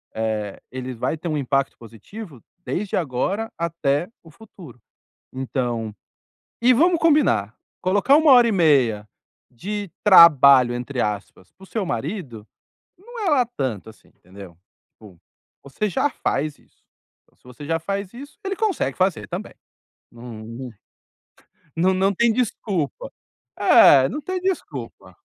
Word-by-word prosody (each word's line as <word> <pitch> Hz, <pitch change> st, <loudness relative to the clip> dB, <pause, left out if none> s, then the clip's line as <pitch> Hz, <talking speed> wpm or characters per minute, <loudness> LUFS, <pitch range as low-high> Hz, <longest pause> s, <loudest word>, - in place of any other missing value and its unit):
eh, 110 Hz, -2 st, -3 dB
ele 130 Hz, 0 st, -6 dB
vai 125 Hz, +7 st, -3 dB
ter 170 Hz, -, -7 dB
um 155 Hz, -, -1 dB
impacto 135 Hz, 0 st, -1 dB
positivo 125 Hz, -, -12 dB, 0.2 s
desde 195 Hz, +1 st, -3 dB
agora 185 Hz, -, -2 dB
até 165 Hz, -1 st, -1 dB
o 165 Hz, -, -16 dB
futuro. 175 Hz, -, -15 dB, 0.5 s
Então 120 Hz, -4 st, -3 dB, 0.7 s
e 250 Hz, +2 st, +6 dB
vamos 340 Hz, +5 st, +3 dB
combinar, 290 Hz, -, +2 dB, 0.2 s
colocar 205 Hz, +9 st, +3 dB
1 310 Hz, -3 st, +5 dB
hora 245 Hz, -2 st, +7 dB
e -, -, 0 dB
1/2 130 Hz, -, +2 dB, 0.4 s
de 200 Hz, -, -6 dB
"trabalho", 140 Hz, -, +7 dB
entre 125 Hz, +1 st, -4 dB
aspas, 100 Hz, -3 st, -4 dB
para 190 Hz, -, -17 dB
o -, -, -15 dB
seu 215 Hz, -1 st, -3 dB
marido, 120 Hz, -, -5 dB, 0.5 s
não 470 Hz, +4 st, -11 dB
é 340 Hz, -, +2 dB
lá 255 Hz, -4 st, +3 dB
tanto 130 Hz, -, -5 dB
assim, 110 Hz, -, -22 dB
entendeu. 90 Hz, -2 st, -15 dB, 0.3 s
Tipo, 100 Hz, -5 st, -17 dB, 0.5 s
você 175 Hz, +10 st, -3 dB
já 290 Hz, -, 0 dB
faz 145 Hz, -, -3 dB
isso. -, -, -30 dB, 0.4 s
Então, -, -, -35 dB
se -, -, -39 dB
você 125 Hz, +4 st, -12 dB
já 165 Hz, +1 st, 0 dB
faz 195 Hz, +3 st, -5 dB
isso, 280 Hz, +4 st, -12 dB
ele 390 Hz, 0 st, -3 dB
consegue 430 Hz, -5 st, -1 dB
fazer 185 Hz, -, -1 dB
também. -, -, -7 dB, 0.6 s
Não, 115 Hz, -2 st, -10 dB
né? 120 Hz, +3 st, -8 dB, 1.1 s
Não 185 Hz, +3 st, +2 dB
não 195 Hz, +2 st, +1 dB
tem 235 Hz, +4 st, +3 dB
desculpa. 200 Hz, -, -3 dB, 0.5 s
É, 135 Hz, -1 st, +6 dB
não 295 Hz, -, -4 dB
tem 370 Hz, +4 st, -4 dB
desculpa. 380 Hz, -1 st, -5 dB
155 Hz, 140 wpm, -22 LUFS, -, 1.1 s, hora